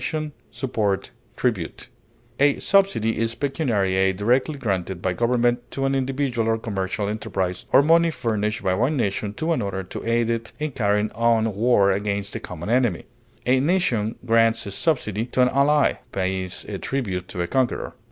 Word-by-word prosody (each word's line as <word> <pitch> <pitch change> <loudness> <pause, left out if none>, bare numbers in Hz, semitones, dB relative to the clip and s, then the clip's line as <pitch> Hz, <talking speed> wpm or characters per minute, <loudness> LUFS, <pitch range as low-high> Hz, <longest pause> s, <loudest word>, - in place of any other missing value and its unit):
bonus, 155 -1 -2 0.4
grant, 100 -3 0 0.2
premium, 100 -10 -1 0.7
A 145 +1 +4
subsidy 190 - +2
is 115 0 0
pecuniary 120 - 0
aid 95 0 +2
directly 125 +8 +1
granted 95 -7 -2
by 95 0 -1
government 120 +3 +1
to 135 - -2
an 135 - +1
individual 135 -3 0
or 115 - +2
commercial 100 -2 -3
enterprise, 95 -3 -3
or 140 - +6
money 165 +2 +5
furnished 110 -7 -2
by 95 - +2
one 125 +10 +1
nation 100 -2 -1
to 165 +6 0
another 100 - -2
to 90 - -7
aid 115 0 +1
it 115 0 -3
in 155 0 -3
carrying 105 -2 +1
on 115 -1 +2
war 100 -2 +3
against 100 0 -2
a - - -2
common 90 +4 -6
enemy. 120 -8 +1 0.4
A 130 +1 +4
nation 130 - +1
grants 115 -1 +3
a 100 - -5
subsidy 115 - 0
to 125 +1 +2
an 125 - +4
ally, 140 +2 +3
pays 95 -1 -2
a - - -5
tribute 95 -9 -3
to 90 - -3
a - - -1
conqueror. 130 +3 -1
115 Hz, 170 wpm, -23 LUFS, 100-130 Hz, 0.7 s, or